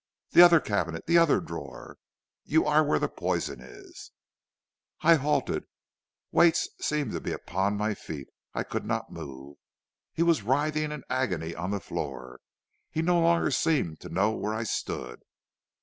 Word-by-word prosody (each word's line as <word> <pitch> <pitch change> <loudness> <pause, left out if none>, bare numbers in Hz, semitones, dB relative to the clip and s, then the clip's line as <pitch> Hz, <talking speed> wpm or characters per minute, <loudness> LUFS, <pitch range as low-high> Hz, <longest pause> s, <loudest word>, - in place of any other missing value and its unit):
'The - - +8
other 175 -2 +8
cabinet, 85 - -2
the 170 +1 +5
other 165 -3 +4
drawer; 70 -6 -9 0.4
you 160 +2 +2
are 150 +1 +4
where 150 - +2
the - - 0
poison - - -3
is.' 65 - -13 0.9
"I 165 +2 +6
halted; 150 -1 0 0.7
weights 170 0 +4
seemed 145 -6 -1
to - - -3
be - - -4
upon 100 +3 -1
my 105 +1 0
feet; 75 -8 -8 0.3
I - - -1
could - - -4
not - - -3
move. 70 +1 -9 0.5
He 165 - 0
was 170 -6 +3
writhing 150 +6 0
in 150 -3 -6
agony 95 -11 -1
on 85 +3 -4
the 100 0 -1
floor; 60 -8 -6 0.5
he 160 0 -2
no 175 +1 +3
longer 170 -2 +3
seemed 135 - 0
to - - -10
know 100 +5 +1
where 110 0 -3
I 110 - -2
stood. 60 - -4
120 Hz, 160 wpm, -28 LUFS, -, 0.9 s, The